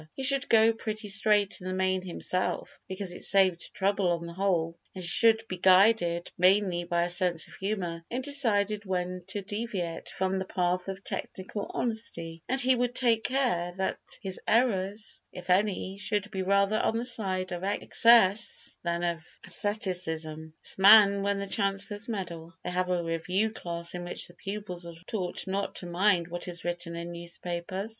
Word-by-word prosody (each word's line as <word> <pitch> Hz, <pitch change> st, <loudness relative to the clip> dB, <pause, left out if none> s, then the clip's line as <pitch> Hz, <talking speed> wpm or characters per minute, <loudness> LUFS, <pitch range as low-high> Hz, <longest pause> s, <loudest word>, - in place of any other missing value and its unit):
He 270 Hz, -, -4 dB
should 275 Hz, +1 st, +3 dB
go 225 Hz, 0 st, +6 dB
pretty 215 Hz, -1 st, -5 dB
straight 205 Hz, -1 st, +2 dB
in 185 Hz, -, -6 dB
the 185 Hz, -, -2 dB
main 185 Hz, 0 st, +1 dB
himself 185 Hz, 0 st, -2 dB
because 190 Hz, -1 st, -4 dB
it -, -, -9 dB
saved 190 Hz, -3 st, +2 dB
trouble 195 Hz, 0 st, +1 dB
on 170 Hz, 0 st, -2 dB
the 170 Hz, -, -7 dB
whole, 170 Hz, -3 st, 0 dB, 0.2 s
and 185 Hz, -, -4 dB
he -, -, +3 dB
should 225 Hz, +4 st, +3 dB
be 185 Hz, -, -5 dB
guided 185 Hz, -2 st, +4 dB
mainly 185 Hz, -1 st, +3 dB
by 170 Hz, -1 st, +1 dB
a 175 Hz, -, -1 dB
sense 175 Hz, -2 st, 0 dB
of -, -, -15 dB
humour 180 Hz, -4 st, -3 dB
in 255 Hz, +2 st, -3 dB
deciding 215 Hz, -7 st, +2 dB
when 180 Hz, -1 st, -2 dB
to 205 Hz, -, -3 dB
deviate 205 Hz, -5 st, -4 dB
from 190 Hz, 0 st, -1 dB
the 190 Hz, -, -3 dB
path 180 Hz, 0 st, -1 dB
of 195 Hz, 0 st, -6 dB
technical 195 Hz, +2 st, -5 dB
honesty, 170 Hz, -8 st, -3 dB
and 265 Hz, +2 st, +2 dB
he 260 Hz, 0 st, +5 dB
would 245 Hz, 0 st, -1 dB
take 230 Hz, -3 st, +3 dB
care 240 Hz, -10 st, 0 dB
that 190 Hz, -, -1 dB, 0.2 s
his 190 Hz, -1 st, -4 dB
errors, 210 Hz, -3 st, +1 dB
if 180 Hz, 0 st, -5 dB
any, 195 Hz, 0 st, +1 dB
should 205 Hz, +1 st, -1 dB
be 190 Hz, -2 st, -2 dB
rather 200 Hz, +2 st, +2 dB
on 225 Hz, -, +1 dB
the 235 Hz, -, -2 dB
side 190 Hz, -6 st, -1 dB
of 175 Hz, +1 st, -4 dB
excess 210 Hz, +1 st, +3 dB
than 170 Hz, 0 st, -2 dB
of 170 Hz, -2 st, -1 dB, 0.2 s
asceticism 160 Hz, -6 st, -3 dB
This -, -, -2 dB
man 200 Hz, 0 st, +8 dB
won 200 Hz, 0 st, 0 dB
the 200 Hz, -, -3 dB
Chancellor's 200 Hz, +2 st, -1 dB
medal. 170 Hz, -6 st, -5 dB
They -, -, -3 dB
have 180 Hz, 0 st, 0 dB
a 180 Hz, -1 st, 0 dB
review 180 Hz, +6 st, 0 dB
class 170 Hz, -4 st, -3 dB
in 175 Hz, 0 st, -5 dB
which 175 Hz, -, -3 dB
the 175 Hz, -, -16 dB
pupils 195 Hz, -1 st, -5 dB
are 170 Hz, -, -9 dB
taught 185 Hz, -5 st, -2 dB
not 195 Hz, +1 st, -2 dB
to -, -, -2 dB
mind 175 Hz, 0 st, +2 dB
what 175 Hz, +1 st, -5 dB
is 175 Hz, -1 st, -6 dB
written 175 Hz, -1 st, -3 dB
in 170 Hz, +1 st, -5 dB
newspapers. 175 Hz, +3 st, -5 dB
190 Hz, 180 wpm, -28 LUFS, 175-210 Hz, 0.2 s, man